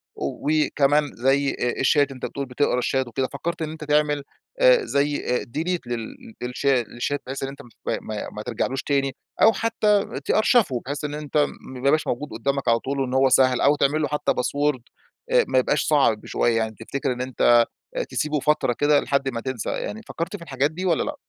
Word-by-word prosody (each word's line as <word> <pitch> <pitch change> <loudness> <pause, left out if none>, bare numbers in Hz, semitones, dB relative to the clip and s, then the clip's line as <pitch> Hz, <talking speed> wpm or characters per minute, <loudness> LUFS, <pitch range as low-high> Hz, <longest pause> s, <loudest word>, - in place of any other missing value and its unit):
وكمان 150 -1 +1
زي 135 +3 +2
أ 125 - -1
الشات 145 +1 +3
أنت 130 - -6
بتقول 140 - -4
بتقرا 125 0 0
الشات 130 +1 0
وكده، 130 +3 -2
فكّرت 170 +4 -4
إن 155 - -2
أنت 155 -1 -8
تعمل 150 -1 +1 0.4
آآ - - +5
زي 145 +1 +1 0.2
آآ - - -6
delete 175 +3 0
لل 115 -1 -6
للشا 125 +1 +1
لشات 120 +5 -3
بحيث 135 +1 -5
إن 135 - -2
أنت 140 +1 -10
مت 120 - -16 0.3
ما 110 -1 -5
ما 105 - -7
ترجعلوش 130 +3 -2
تاني، 135 -2 0 0.3
أو 225 - +7
حتّى 210 -8 +1
تأرشفه 215 - +3
بحيث 145 +3 -4
إن 145 - -4
أنت 150 0 -3
م 145 - +3 0.2
ما 130 - -7
يبقاش 155 +2 +3
موجود 145 +5 -2
قدّامك 135 +5 -2
على 115 0 +4
طول 135 +3 -3
وإن 130 -1 -1
هو 135 0 +4
سهل، 130 -1 +4
أو 145 - +5
تعمل 150 +2 +1
له 150 - +1
حتّى 150 +1 0
Password 145 +2 0 0.5
آآ - - +5
ما - - +3
يبقاش 145 +4 +1
صعب 135 -8 +2
شوية، 115 -1 +1
يعني 110 -1 -1
تفتكر 130 +3 -3
إن 125 - -6
أنت 120 -2 +4 0.5
تسيبه 150 0 -1
فترة 150 -3 +1
كده 145 0 +4
لحد 140 -1 0
ما 115 -3 -4
تنسى، 130 -3 -4
يعني 220 - -4
فكّرت 165 0 -4
في - - -19
الحاجات 140 -1 0
دي 180 +4 -5
والّا 170 -4 +2
لأ؟ 295 - -4
140 Hz, 200 wpm, -23 LUFS, 130-150 Hz, 0.5 s, أو